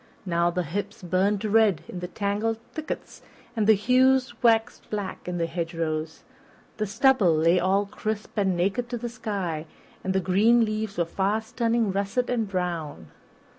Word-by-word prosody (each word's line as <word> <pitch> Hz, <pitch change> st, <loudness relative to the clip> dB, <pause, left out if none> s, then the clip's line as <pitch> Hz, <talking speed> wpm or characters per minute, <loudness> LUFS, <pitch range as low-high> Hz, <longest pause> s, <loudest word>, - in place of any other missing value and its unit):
Now 170 Hz, -1 st, +2 dB
the 180 Hz, +1 st, -1 dB
hips 185 Hz, +5 st, -5 dB
burned 195 Hz, +4 st, +1 dB
red 215 Hz, -5 st, +3 dB
in 180 Hz, -, -6 dB
the 180 Hz, -, -4 dB
tangled 205 Hz, +4 st, -1 dB, 0.2 s
thickets 315 Hz, -1 st, -6 dB, 0.3 s
and 215 Hz, -2 st, +1 dB
the 220 Hz, -, +7 dB
hews 255 Hz, +4 st, +3 dB
waxed 225 Hz, -2 st, +2 dB
black 205 Hz, -4 st, -5 dB
in 180 Hz, 0 st, -2 dB
the 170 Hz, -, 0 dB
hedgerows, 165 Hz, -2 st, -3 dB, 0.5 s
the 215 Hz, -1 st, -1 dB
stubble 220 Hz, -, +4 dB
lay 165 Hz, +3 st, +4 dB
all 195 Hz, +3 st, +2 dB
crisp 215 Hz, +1 st, -5 dB
and 190 Hz, -4 st, +1 dB
naked 200 Hz, +7 st, 0 dB
to 240 Hz, -, -3 dB
the 240 Hz, +1 st, -4 dB
sky, 190 Hz, -8 st, -4 dB, 0.4 s
and 190 Hz, -, -1 dB
the -, -, +4 dB
green 210 Hz, +6 st, +4 dB
leaves 215 Hz, -1 st, -3 dB
were 170 Hz, -, +2 dB
fast 210 Hz, +7 st, -2 dB
turning 230 Hz, -3 st, +1 dB
russet 200 Hz, +6 st, -1 dB
and 225 Hz, -4 st, 0 dB
brown. 170 Hz, -, -4 dB
200 Hz, 165 wpm, -26 LUFS, 180-225 Hz, 0.5 s, the